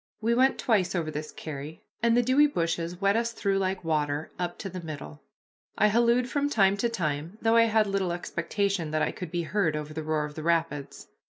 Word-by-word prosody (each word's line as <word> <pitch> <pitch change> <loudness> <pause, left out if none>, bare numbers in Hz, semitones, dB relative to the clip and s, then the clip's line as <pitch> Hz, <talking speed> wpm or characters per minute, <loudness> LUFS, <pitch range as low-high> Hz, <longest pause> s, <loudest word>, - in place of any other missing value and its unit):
We 225 +2 +1
went 260 +3 +3
twice 195 -6 +1
over 160 -3 -1
this 155 0 -5
carry, 150 0 -8 0.2
and 235 0 +3
the 245 - +4
dewy 265 +5 +5
bushes 170 - -2
wet 200 +1 +3
us 230 0 0
through 195 -3 0
like 190 -1 -1
water 150 -1 -1
up 175 -1 -3
to 200 - -5
the 185 -1 -6
middle. 145 - -8 0.6
I 210 - +4
hallooed 235 +3 +3
from 285 +2 0
time 200 -7 +4
to 235 +4 +1
time, 165 -3 -3
though 225 0 +2
I 230 0 +6
had 220 -1 +3
little 195 -3 -1
expectation 175 +1 -2
that 155 0 0
I - - 0
could 180 - -7
be 175 +1 -2
heard 165 -3 0
over 150 0 -5
the 160 - -4
roar 155 -1 -1
of 150 - -8
the 155 - -6
rapids. 160 -3 -1
180 Hz, 215 wpm, -27 LUFS, 155-220 Hz, 0.6 s, I